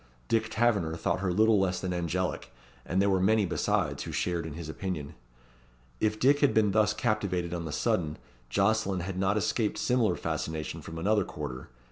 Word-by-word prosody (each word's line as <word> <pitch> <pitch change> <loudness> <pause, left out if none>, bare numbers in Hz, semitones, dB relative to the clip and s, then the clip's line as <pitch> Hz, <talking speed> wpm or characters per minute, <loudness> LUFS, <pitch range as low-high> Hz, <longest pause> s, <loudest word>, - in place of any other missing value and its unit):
Dick 110 -1 +1
Taverner 110 -8 +1
thought 85 - -1
her 95 -1 0
little 110 +3 +4
less 95 -1 +1
than 95 -1 -2
angelic, 90 +1 -2 0.4
and 95 - 0
there 100 +1 +3
were 95 - +3
many 105 +2 +3
besides 85 - 0
who - - -5
shared 85 -2 -1
in 80 - -7
his 85 -2 -6
opinion. 80 -3 -4 0.9
If 110 0 0
Dick 140 +3 +4
had 145 - +3
been 105 -2 +4
thus 105 0 +3
captivated 95 -8 -1
on 85 -1 -3
the 80 - -4
sudden, 75 +1 0 0.3
Jocelyn 100 - +1
had 95 +1 -4
not 95 +2 +2
escaped 105 +2 0
similar 115 -7 +2
fascination 80 -1 -3
from 80 - -8
another 105 +4 +2
quarter. 65 -7 -7
95 Hz, 180 wpm, -29 LUFS, 85-110 Hz, 0.9 s, little